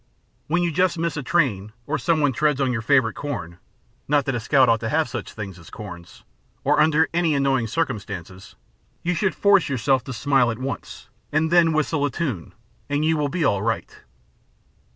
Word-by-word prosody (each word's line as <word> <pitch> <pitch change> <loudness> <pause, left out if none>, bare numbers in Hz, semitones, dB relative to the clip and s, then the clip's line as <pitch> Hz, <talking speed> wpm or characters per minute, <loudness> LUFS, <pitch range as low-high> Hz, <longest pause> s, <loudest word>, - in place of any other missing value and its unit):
When 175 +3 +1
you 170 - 0
just 180 +2 +1
miss 170 0 -1
a 150 - -3
train, 120 - 0
or 155 +1 -2
some 165 -3 +1
one 145 -2 +2
treads 150 +1 +1
on 135 -2 +1
your 115 - -2
favorite 120 -2 +3
corn 120 - -5
ŌĆö 85 - -18 0.5
not 145 -1 +2
that 135 - -1
a 120 - -1
scout 130 +3 +3
ought 115 -1 +3
to 110 - -3
have 155 +1 +1
such 120 -1 -6
things 95 -4 -7
as 80 - -14
corns 90 -5 -10
ŌĆö - - -40
or - - +2
under 160 +1 +4
any 165 -3 +2
annoying 135 -4 +1
circumstances, 100 - -4 0.5
you 175 - 0
should 185 +3 0
force 200 -5 +4
yourself 130 0 +1
to - - -6
smile 130 0 +2
at 115 - -3
once, 130 -3 -6 0.2
and 155 +2 +1
then 170 -2 +5
whistle 155 -1 0
a 145 - +2
tune, 135 - -4 0.3
and 145 +1 0
you 160 0 +3
will 150 -2 0
be 165 +1 -1
all 100 -7 +2
right. 115 0 -3
140 Hz, 205 wpm, -23 LUFS, 115-160 Hz, 0.5 s, then